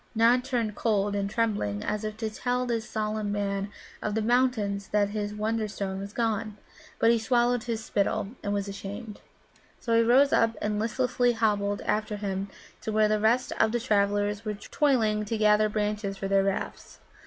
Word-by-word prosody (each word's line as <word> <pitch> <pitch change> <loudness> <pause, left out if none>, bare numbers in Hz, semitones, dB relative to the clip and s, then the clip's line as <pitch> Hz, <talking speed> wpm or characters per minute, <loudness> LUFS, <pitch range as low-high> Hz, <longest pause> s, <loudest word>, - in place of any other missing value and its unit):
Nod 235 +3 +4
turned 240 -5 -1
cold, 205 -2 0
and 200 0 -1
trembling, 205 - -1
as 210 0 -2
if 215 0 -4
to 220 -1 -3
tell 250 +3 -1
this 235 -1 -2
solemn 215 -1 -2
Man 200 -1 -2 0.3
of 210 0 -2
the 220 - +1
Mountains 220 -5 +1
that 205 -1 +1
his 205 0 -3
Wonderstone 210 -2 -2
was 200 +1 -6
gone. 220 -2 -1 0.4
But 230 - +4
he 235 - +3
swallowed 245 +1 +1
his 225 -2 -3
spittle, 200 -1 0
and 205 - -3
was 200 0 -1
ashamed. 200 +2 -7 0.6
So 230 -2 0
he 230 - +6
rose 255 +5 +5
up 230 0 +3
and 210 0 -1
listlessly 245 +2 +1
hobbled 205 -3 0
after 215 0 -1
him 200 -1 -3 0.3
to 220 - -3
where 215 0 +4
the 215 0 +1
rest 230 +4 +2
of 220 - +4
the 240 - +1
travellers 205 -2 +1
were 215 -1 -3
toiling 220 -3 +1
to 225 +2 -2
gather 215 0 +4
branches 210 -1 -2
for 195 - -3
their 195 0 +3
rafts. 195 -1 -4
215 Hz, 180 wpm, -27 LUFS, 205-230 Hz, 0.6 s, he